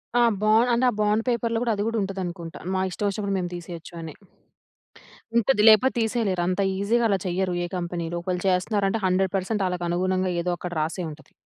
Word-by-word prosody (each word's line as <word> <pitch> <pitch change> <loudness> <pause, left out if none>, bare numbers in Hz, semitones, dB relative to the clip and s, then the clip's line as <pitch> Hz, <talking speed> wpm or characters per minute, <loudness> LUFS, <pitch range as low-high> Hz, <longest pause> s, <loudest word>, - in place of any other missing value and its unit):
ఆ! 245 - +5 0.2
బాండ్ 220 +3 +4
అంటే, 245 +2 +2
ఆ - - -2
బాండ్ 210 +2 +2
పేపర్‌లో 235 -1 0
గూడా 230 -2 +1
అది 205 - -1
గూడా 230 - -1
ఉంటదనుకుంటా! 180 -4 -5 0.2
మా 185 - +1
ఇష్టమొచ్చినప్పుడు 200 +1 -2
మేము 175 -1 -3
తీసేయొచ్చు 175 0 -9
అని. 160 -2 -7 1.2
ఉంటది. 235 -1 +3
లేపో 220 +4 +6
తీసేయలేరు, 220 -5 0
అంత 185 +2 0 0.2
ఈజీగా 230 +4 +1
అలా 200 - +3
చెయ్యరు, 185 0 -1
ఏ - - -4
కంపెనీలో. 170 -1 -3
ఒకేళ 180 -1 -1
చేస్త్నారంటే, 195 +3 +1
100% 190 +2 0
ఆళ్ళకనుగుణంగా 180 +1 0
ఏదో 180 +1 -1
అక్కడ 180 0 -6
రాసే 165 +4 -2
ఉంటది. 155 +1 -15
190 Hz, 170 wpm, -25 LUFS, 180-215 Hz, 1.2 s, లేపో